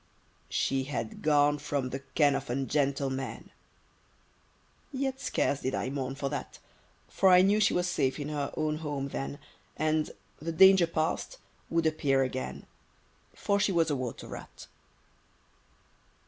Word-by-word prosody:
She 135 -1 0
had 115 -5 -4
gone 145 -1 +3
from 140 -3 -2
the 135 - -3
ken 145 +1 +2
of - - -3
ungentle 135 +1 0
men! 130 0 -5 1.4
Yet 270 -1 -2
scarce 140 - 0
did 130 - -1
I 130 - -2
mourn 135 -1 -3
for 140 0 -3
that; - - -5 0.5
For 190 - +3
I 180 0 +7
knew 205 +2 +4
she 210 - +3
was 180 - +1
safe 135 -5 0
in 145 0 -4
her 145 -2 -2
own 155 -1 0
home 145 -3 -3
then, 135 +1 -4 0.4
And, 155 0 +1 0.3
the 165 +3 -3
danger 190 +1 +7
past, 165 - -2 0.3
would 165 -1 +1
appear 145 -4 +2
again, 130 0 -4 0.7
For 200 0 0
she 200 - +2
was 165 -3 +2
a - - +1
water 130 -3 -5
rat. - - -10
145 Hz, 145 wpm, -29 LUFS, 135-165 Hz, 1.4 s, I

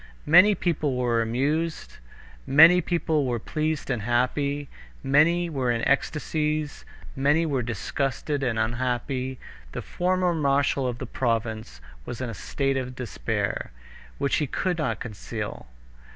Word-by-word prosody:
Many 180 +7 +7
people 155 -7 -1
were 120 -2 +1
amused, 145 +8 -1 0.5
many 165 +6 +8 0.3
were 140 -7 +1
pleased 155 +4 -2
and 120 -4 -1
happy, 140 +5 0 0.4
many 170 +5 +3
were 135 -6 -1
in 115 -1 0
ecstasies, 150 +1 -1 0.3
many 145 +4 +2
were 140 -5 0
disgusted 135 +5 -2
and 125 -4 0
unhappy. 125 +3 -1 0.4
The - - -5
former 180 0 0
marshal 140 -3 +1
of 120 -1 -3
the 130 - -5
province 110 - -2 0.2
was 115 - -7
in 125 -2 -3
a - - -6
state 135 +6 -1
of 130 -1 -4
despair, 125 -4 -3 0.5
which 140 0 +1
he 150 - 0
could 180 +5 -1
not 115 -7 -1
conceal. 105 - -6
135 Hz, 130 wpm, -25 LUFS, 120-155 Hz, 0.5 s, many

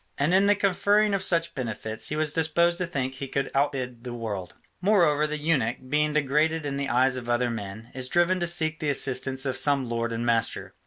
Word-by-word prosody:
And 145 +5 +1
in 195 +2 +4
the 205 - +5
conferring 205 +2 +2
of 195 - 0
such 170 -1 +2
benefits 110 -3 -4
he 150 - -2
was 155 -1 0
disposed 170 +2 +2
to 180 - -1
think 130 -6 -3
he 135 +1 -6
could 135 +1 -2
outbid 130 -4 -1
the 120 -1 -6
world. 100 -6 -5 0.3
Moreover 170 -7 +3
the 150 0 -3
eunuch, 145 -7 0
being 150 +1 +1
degraded 150 +2 +1
in 140 -1 -3
the 140 0 -3
eyes 130 +2 +2
of 120 -1 -7
other 120 0 +1
men, 110 0 -7
is 130 -1 -4
driven 175 +2 +2
to 175 - -1
seek 160 -2 0
the 150 - -1
assistance 130 -1 0
of 130 -1 -1
some 135 -1 +2
lord 115 0 -2
and 115 +1 -3
master. 115 -1 0
140 Hz, 215 wpm, -26 LUFS, 125-165 Hz, 0.3 s, the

